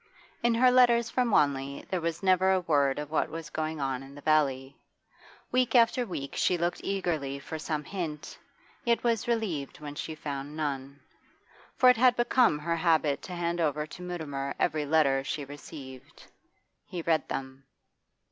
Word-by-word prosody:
In 235 -1 +2
her 250 +2 +5
letters 240 -2 +4
from 250 -2 +1
Wanley 140 -7 +1
there 185 -2 0
was 165 +2 -3
never 185 0 +4
a 190 - +3
word 145 -5 +2
of 150 0 -5
what 160 - +1
was 165 -1 -7
going 155 0 -3
on 135 -2 -2
in 135 +1 -12
the 145 - -11
valley. 140 -3 +1 0.8
Week 250 -2 +2
after 240 +1 +4
week 140 -7 -5
she 180 - +2
looked 175 +1 -1
eagerly 165 -8 -2
for 160 +3 -7
some 155 -1 -3
hint, 165 -4 -6 0.4
yet 235 -1 +1
was 230 -3 +1
relieved 200 - -2
when 150 -1 -7
she 155 +2 -5
found 145 0 -6
none. 140 -2 -4 0.8
For 255 - +5
it 250 -2 +7
had 245 +1 +5
become 240 - +3
her 165 +2 -2
habit 160 -4 +2
to 180 - -8
hand 170 0 -1
over 150 -1 0
to 165 +3 -11
Mutimer 150 -6 -4
every 155 -3 0
letter 140 -3 +3
she 145 +1 -4
received. 135 -2 -11 0.6
He 175 -2 -5
read 160 -2 +1
them. 135 0 -5
155 Hz, 170 wpm, -29 LUFS, 140-185 Hz, 0.8 s, it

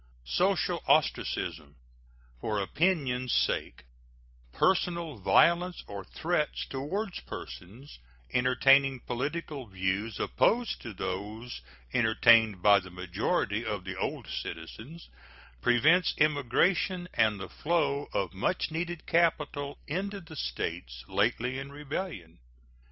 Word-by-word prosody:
Social - - +1
ostracism 75 -1 +1 0.6
for 105 - -1
opinion's 130 - 0
sake, - - 0 0.7
personal 170 - +1
violence 170 - +3
or 100 -1 -7
threats 155 - -1
toward 180 +10 -3
persons 110 - -9 0.3
entertaining 135 +1 +4
political 140 +1 -4
views 95 +3 -2
opposed 240 0 +1
to 115 - -7
those 105 +7 -5 0.3
entertained 110 -4 +4
by 100 -1 +7
the 95 -1 -11
majority 90 -1 -1
of - - -3
the - - -5
old - - -3
citizens, 110 - -7 0.5
prevents 155 - +4
immigration 155 +5 +2
and 110 -3 +2
the 95 - -6
flow 145 -3 0
of 100 - -1
much 130 - -1
needed 170 +1 -4
capital 150 -4 +1
into 195 +6 -3
the 170 - -12
States - - -4
lately 120 +6 0
in 140 +1 -7
rebellion. 145 - -6
130 Hz, 105 wpm, -29 LUFS, 100-165 Hz, 0.7 s, by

